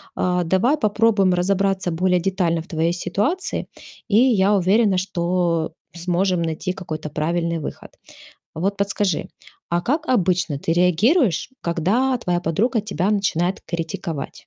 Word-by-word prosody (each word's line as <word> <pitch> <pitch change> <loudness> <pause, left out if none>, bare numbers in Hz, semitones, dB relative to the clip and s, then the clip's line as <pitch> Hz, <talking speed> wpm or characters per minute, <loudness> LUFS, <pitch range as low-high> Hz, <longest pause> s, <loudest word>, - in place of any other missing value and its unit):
А, 180 -1 +1
давай 190 - +2
попробуем 210 -5 +2
разобраться 190 0 0
более 180 +2 +2
детально 175 -2 0
в - - -21
твоей 165 +1 0
ситуации, 275 - -2 0.4
и 210 -2 +3
я 210 -5 +4
уверена, 195 +1 +3
что 175 -3 -1 0.2
сможем 180 +1 0
найти 165 +3 -2
какой-то 155 -4 -6
правильный 165 +2 -1
выход. - - -7 0.6
Вот 195 +5 -2
подскажи, 200 -4 0 0.4
а 170 0 +1
как 305 - -1
обычно 180 - +1
ты 160 - -2
реагируешь, 180 - +2
когда 205 +11 +1
твоя 180 -7 -1
подруга 200 +9 0
тебя 200 -2 -1
начинает 190 -3 0
критиковать? 165 -3 -4
180 Hz, 130 wpm, -21 LUFS, 170-205 Hz, 0.6 s, я